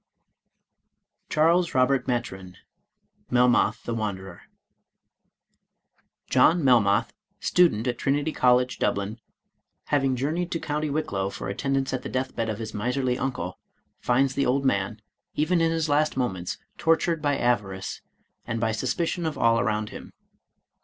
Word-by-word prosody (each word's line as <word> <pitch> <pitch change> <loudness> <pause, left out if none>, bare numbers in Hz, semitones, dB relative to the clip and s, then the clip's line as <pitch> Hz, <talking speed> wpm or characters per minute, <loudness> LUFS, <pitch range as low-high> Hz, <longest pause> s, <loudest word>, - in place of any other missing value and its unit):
i6i - - -54
Charles 165 +2 +2
Robert 130 0 +2
Maturin 95 -7 -3 0.7
Melmoth 125 -1 +3
the 120 - -3
Wanderer 100 -4 -4 1.9
John 160 +6 +4
Melmoth, 115 -3 +3 0.3
student 165 -11 +3
at 120 -2 -2
Trinity 145 +3 0
College, 125 -2 +2
Dublin, 100 +3 -1 0.7
having 135 -3 +2
jour 135 +4 -1
neyed 175 +2 -2
to 165 - -2
County 150 0 -2
Wicklow 140 -11 -2
for 100 - -6
attendance 135 +5 -1
at 130 - -2
the - - -6
deathbed 130 -3 -2
of 110 - -3
his 110 -1 -6
miserly 125 +4 -1
uncle, 125 -9 -3 0.4
finds 130 +2 +2
the 140 - 0
old 135 +2 +1
man, 100 -2 0 0.4
even 165 +3 +2
in 165 - +3
his 165 -1 0
last 150 -1 +1
moments, 95 -9 -2 0.2
tortured 165 0 +2
by 145 -2 +1
avarice, 100 -6 -1 0.5
and 115 - -2
by 110 0 +1
suspicion 165 +9 -1
of 155 - -4
all 115 0 +3
around 110 -2 -1
him. - - -10
125 Hz, 140 wpm, -25 LUFS, 110-145 Hz, 1.9 s, John